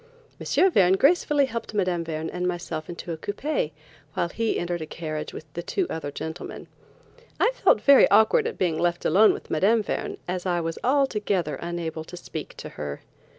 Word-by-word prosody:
M. 380 - +3
Verne 185 - +5
gracefully 290 - +3
helped 230 -3 -6
Mme. 180 -4 +1
Verne 160 -1 -4
and 180 0 -2
myself 175 -3 -4
into 170 0 -6
a 165 - -3
coupé, 205 - -2 0.4
while 170 - 0
he 225 +4 -1
entered 175 -1 -2
a 155 - -5
carriage 155 -2 -5
with - - -9
the 170 - -4
two 375 - -1
other 150 -3 -4
gentlemen. 160 +4 -7 0.7
I 480 - +4
felt - - +3
very 280 -1 +7
awkward 220 - +5
at - - -5
being 170 -4 0
left 175 0 0
alone 205 +7 +6
with - - -7
Mme. 205 +8 +3
Verne, - - -3
as 180 +1 -3
I 175 -1 +1
was 165 -1 -3
altogether 210 - +1
unable 170 -2 -4
to 180 - -9
speak - - -7
to - - -7
her. 75 -1 -6
180 Hz, 185 wpm, -25 LUFS, 165-220 Hz, 0.7 s, very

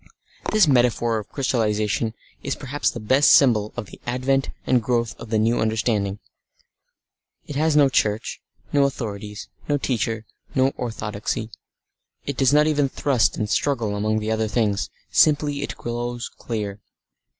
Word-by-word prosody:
This 215 -5 +5
metaphor 120 -3 +2
of 105 - -10
crystallisation 110 -4 0 0.3
is 140 - -2
perhaps 140 +1 -1
the - - -6
best 130 +7 +5
symbol 110 -6 +4
of 120 - -3
the - - -14
advent 130 +2 0 0.2
and 125 -2 +3
growth 115 -1 0
of 115 - -9
the 110 - +1
new 115 +2 +2
understanding. 110 -2 0 1.3
It 145 - -7
has 155 +1 +2
no 145 -2 +6
church, 110 -4 0 0.3
no 140 -1 +4
authorities, 105 -6 -5 0.2
no 145 - +3
teachers, 115 -5 -1 0.3
no 130 0 +4
orthodoxy. 110 -3 -4 0.7
It 140 - -3
does 135 0 +3
not 150 +1 +5
even 145 -3 +2
thrust 130 -3 +1
and 105 - -1
struggle 115 -4 0
among 110 +1 0
the 110 0 -2
other 110 0 0
things; 105 -3 0 0.2
simply 145 -2 +3
it - - -5
grows 120 0 -4
clear. 105 -3 -4
120 Hz, 150 wpm, -23 LUFS, 110-135 Hz, 1.3 s, no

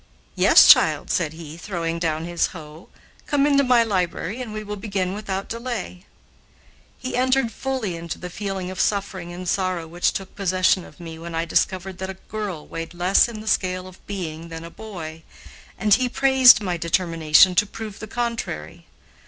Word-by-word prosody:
"Yes, - - +7
child," - - +5
said 165 -5 0
he, 160 -1 -10
throwing 170 -2 -3
down 160 -1 -1
his 175 0 0
hoe, 155 +2 -12 0.4
"come 285 -1 +2
into 280 -1 +4
my 250 -2 +4
library 195 +2 -2
and 240 -4 -6
we 215 0 -5
will 210 0 -5
begin 195 -3 -2
without 200 -2 -4
delay." 230 -6 -5 0.9
He 255 - -5
entered 255 -1 +2
fully 255 -6 -3
into 165 0 -6
the 180 -1 -8
feeling 195 -2 -4
of 185 - -8
suffering 190 -4 -1
and 180 +1 -7
sorrow 185 -3 -1
which 175 +2 0
took 195 -1 -7
possession 185 -1 +2
of - - -16
me 165 -2 -8
when 165 0 -7
I 165 +1 0
discovered 185 +2 -1
that 190 0 -4
a 190 - -6 0.2
girl 200 -7 -4
weighed 165 +1 -7
less 180 +5 +4
in 220 -2 -7
the 220 - -11
scale 185 -3 0
of 185 0 -15
being 170 -4 -5
than 165 0 -7
a 170 - -9
boy, 165 -7 -8 0.6
and 210 +1 +3
he 255 +2 +3
praised 260 -3 +6
my 180 -3 -1
determination 165 0 +4
to 205 +4 +3
prove 215 -1 -8
the 215 - -7
contrary. 235 +1 -4
185 Hz, 180 wpm, -23 LUFS, 170-215 Hz, 0.9 s, Yes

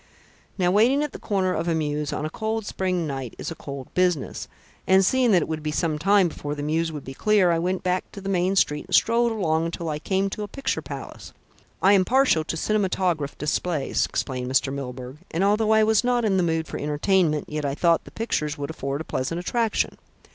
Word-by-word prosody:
"Now, 180 -2 +2
waiting 245 +9 +4
at 300 - -3
the - - -9
corner 190 -3 0
of 165 +2 -2
a 165 - +1
mews 150 -2 -2
on 150 - -3
a - - -2
cold 220 0 -3
spring 185 -4 -1
night 135 -5 -5
is - - -5
a - - -5
cold 140 -3 -8
business, 180 -6 0 0.4
and 190 0 +5
seeing 255 +4 +3
that 180 -6 +4
it - - -5
would 160 -1 -3
be 155 - -3
some 155 0 -1
time 195 +2 +4
before 145 -2 -5
the 145 - -5
mews 160 +2 0
would 150 -3 -7
be 135 - -7
clear, 200 +2 +3
I 165 - +1
went 180 +2 -1
back 185 0 -1
to - - -7
the 195 - -7
main 185 0 +1
street 150 -4 +1
and 185 - +1
strolled 235 +1 +3
along 165 -7 0
until 165 0 -4
I 150 -1 -3
came 190 +5 0
to 210 - -5
a 210 - -3
picture 275 +4 -2
palace. - - -9 0.5
I 195 +2 +6
am 190 -2 +5
partial 255 -8 +3
to 165 - -3
cinematograph 185 -7 0
displays," 150 -1 -1
explained 130 -2 -3
Mr. 135 0 +2
Milburgh, 130 -1 -6
"and, 170 +4 -1
although 210 +2 +2
I 220 0 +5
was 220 +1 +3
not 245 -1 +1
in 195 -3 +2
the - - +3
mood 165 -2 0
for 140 - -6
entertainment, 150 +1 +1
yet 150 0 -4
I 140 -1 -1
thought 170 +1 +2
the - - -10
pictures 155 -9 -2
would 145 +1 -4
afford 140 -1 -4
a - - -4
pleasant 155 +2 -3
attraction. 225 +5 -1
175 Hz, 225 wpm, -24 LUFS, 150-200 Hz, 0.5 s, I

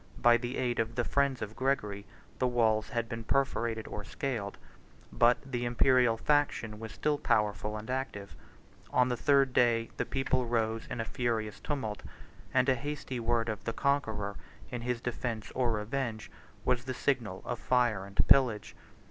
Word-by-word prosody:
By 120 0 +6
the 120 +1 -4
aid 120 -2 0
of 115 0 -1
the 120 - +1
friends 140 -1 +1
of 105 +1 -7
Gregory, 105 -7 -1 0.3
the 130 - +3
walls 110 -3 +2
had 115 -1 -1
been 115 -1 -5
perforated 115 -4 0
or 105 - -5
scaled; 115 -4 -4 0.6
but 120 +1 +5
the 125 -3 -3
Imperial 120 -1 +4
faction 115 -6 +1
was 110 -1 -7
still 150 +4 0
powerful 105 0 +1
and 105 +1 -8
active; 125 -6 -4 0.5
on 125 0 +3
the 125 - +1
third 135 0 +3
day, 115 -2 +3
the - - 0
people 130 -2 0
rose 115 -1 0
in 125 - -5
a 115 - -1
furious 110 -3 -2
tumult; 120 -9 -3 0.5
and 130 0 +3
a 130 - +5
hasty 135 -1 -4
word 115 0 +1
of 110 -2 -3
the 115 - -1
conqueror, 110 -9 0 0.3
in 125 - -4
his 120 0 -2
defence 120 -2 -3
or 125 -2 +1
revenge, 110 +1 -3 0.3
was 125 -1 +1
the 130 -1 -3
signal 120 -9 -1
of 120 -2 -3
fire 120 -6 +2
and 100 0 0
pillage. 125 -7 +4
120 Hz, 170 wpm, -31 LUFS, 110-130 Hz, 0.6 s, By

